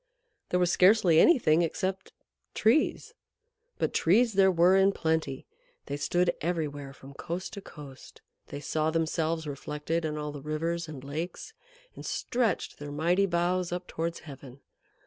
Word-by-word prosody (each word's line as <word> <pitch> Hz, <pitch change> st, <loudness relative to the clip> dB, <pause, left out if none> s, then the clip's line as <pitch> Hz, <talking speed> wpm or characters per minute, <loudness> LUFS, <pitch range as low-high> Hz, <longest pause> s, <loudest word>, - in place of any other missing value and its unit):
There 180 Hz, -, +1 dB
was 175 Hz, -1 st, +2 dB
scarcely 185 Hz, -4 st, +5 dB
anything 175 Hz, -, +5 dB
except 185 Hz, +3 st, -2 dB, 0.4 s
Trees. 310 Hz, -, +1 dB, 0.6 s
But -, -, -1 dB
Trees 220 Hz, +7 st, +3 dB
there 195 Hz, -1 st, +5 dB
were 180 Hz, +1 st, +4 dB
in 195 Hz, +1 st, +4 dB
plenty. 160 Hz, -6 st, -1 dB, 0.4 s
They -, -, -4 dB
stood 175 Hz, +4 st, +1 dB
everywhere 150 Hz, -5 st, -3 dB
from 135 Hz, 0 st, -13 dB
coast 175 Hz, +6 st, -5 dB
to 200 Hz, -, -7 dB
coast; 140 Hz, -7 st, -13 dB, 0.2 s
they 145 Hz, -, -7 dB
saw 155 Hz, +1 st, 0 dB
themselves 160 Hz, 0 st, -1 dB
reflected 150 Hz, +3 st, -3 dB
in 155 Hz, -1 st, -3 dB
all 150 Hz, 0 st, -4 dB
the 145 Hz, -1 st, -8 dB
rivers 165 Hz, +3 st, -2 dB
and 145 Hz, -4 st, -9 dB
lakes, 165 Hz, -, -6 dB, 0.4 s
and -, -, -10 dB
stretched 235 Hz, -6 st, -2 dB
their 145 Hz, 0 st, -7 dB
mighty 175 Hz, +6 st, +2 dB
boughs 175 Hz, 0 st, 0 dB
up 180 Hz, 0 st, -4 dB
towards 165 Hz, +1 st, -4 dB
heaven. 140 Hz, -3 st, -12 dB
165 Hz, 145 wpm, -28 LUFS, 150-180 Hz, 0.6 s, scarcely